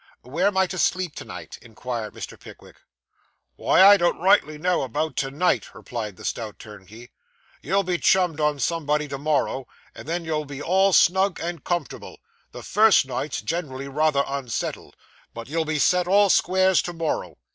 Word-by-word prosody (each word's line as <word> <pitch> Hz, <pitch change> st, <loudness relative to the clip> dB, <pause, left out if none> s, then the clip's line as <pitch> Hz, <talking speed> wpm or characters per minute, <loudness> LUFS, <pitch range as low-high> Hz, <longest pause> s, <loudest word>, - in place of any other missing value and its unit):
'Where 160 Hz, +10 st, 0 dB
am 200 Hz, -2 st, -1 dB
I 190 Hz, -, +4 dB
to 185 Hz, 0 st, -6 dB
sleep 180 Hz, 0 st, 0 dB
to -, -, -7 dB
night?' -, -, -9 dB
inquired 115 Hz, -1 st, -6 dB
Mr. -, -, -8 dB
Pickwick. -, -, -15 dB, 0.8 s
'Why, 190 Hz, -, +4 dB
I 200 Hz, +1 st, +9 dB
don't 175 Hz, -2 st, +1 dB
rightly 180 Hz, -4 st, +3 dB
know 180 Hz, +3 st, 0 dB
about 145 Hz, +3 st, -3 dB
to 135 Hz, -, -1 dB
night,' 155 Hz, +7 st, -1 dB
replied 110 Hz, -6 st, -6 dB
the -, -, -12 dB
stout 110 Hz, -3 st, -4 dB
turnkey. 105 Hz, +3 st, -13 dB, 0.5 s
'You'll 195 Hz, +5 st, 0 dB
be 180 Hz, -2 st, -2 dB
chummed 180 Hz, -5 st, +2 dB
on 150 Hz, -1 st, +1 dB
somebody 150 Hz, +1 st, -1 dB
to 140 Hz, -, -5 dB
morrow, 140 Hz, -3 st, -1 dB, 0.3 s
and -, -, -12 dB
then 170 Hz, +1 st, -3 dB
you'll 155 Hz, -1 st, -2 dB
be 140 Hz, -1 st, -8 dB
all 190 Hz, +5 st, +2 dB
snug 190 Hz, +1 st, +3 dB
and 170 Hz, -3 st, -5 dB
comfortable. 175 Hz, -1 st, -4 dB, 0.3 s
The -, -, -10 dB
first 215 Hz, -8 st, +4 dB
night's 135 Hz, +1 st, -4 dB
generally 140 Hz, -5 st, -4 dB
rather 145 Hz, 0 st, +1 dB
unsettled, 135 Hz, -4 st, -5 dB, 0.4 s
but 115 Hz, -1 st, -8 dB
you'll 160 Hz, +3 st, -1 dB
be 155 Hz, 0 st, -1 dB
set 180 Hz, +4 st, +2 dB
all 200 Hz, +1 st, +4 dB
squares 185 Hz, 0 st, +3 dB
to 175 Hz, -, -6 dB
morrow. 155 Hz, -, -3 dB
155 Hz, 175 wpm, -23 LUFS, 135-180 Hz, 0.8 s, I